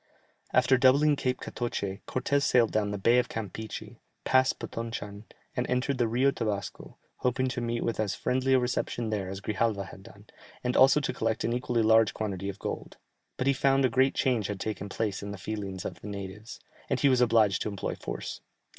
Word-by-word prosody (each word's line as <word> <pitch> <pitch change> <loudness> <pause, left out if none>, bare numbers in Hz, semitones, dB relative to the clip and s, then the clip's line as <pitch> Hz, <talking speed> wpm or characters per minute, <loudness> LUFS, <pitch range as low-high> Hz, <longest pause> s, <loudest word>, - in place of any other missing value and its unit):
After 130 0 +4
doubling 140 +3 +5
Cape 130 -2 -1
Catoche, 100 -5 -4
Cortès 140 +2 0
sailed 120 -4 +3
down 105 -1 +1
the 105 - -3
Bay 115 +5 +4
of 125 - -1
Campeachy, 110 0 -6 0.2
passed 130 0 +3
Potonchan, 110 -3 -6 0.3
and - - -1
entered 125 +2 0
the 120 - +3
Rio 125 +5 +3
Tabasco, 105 -6 -4 0.2
hoping 130 +1 0
to 125 -1 -3
meet 120 0 -1
with 115 - -2
as 105 -3 0
friendly 130 +1 +1
a - - +5
reception 120 -2 -2
there 100 -3 -2
as 95 +1 -6
Grijalva 100 -2 -1
had 95 - -12
done, 100 +1 -15 0.4
and 125 0 0
also 135 +3 +6
to 145 - -2
collect 110 0 -1
an 115 - 0
equally 120 -2 0
large 110 0 +4
quantity 100 -3 -3
of 100 - -6
gold; - - -5 0.4
but 130 - -1
he 140 - +4
found 135 0 +3
a - - +3
great 130 +3 +3
change 120 -6 +1
had 105 -2 -4
taken 100 -2 -4
place 105 -1 -2
in 100 - -6
the 100 - -6
feelings 95 -1 -5
of 85 -2 -6
the - - -8
natives, 100 +2 -7 0.3
and - - 0
he - - +5
was 130 -2 +4
obliged 110 -5 +4
to - - -1
employ 100 -2 -3
force. - - -6
115 Hz, 200 wpm, -28 LUFS, 100-130 Hz, 0.4 s, also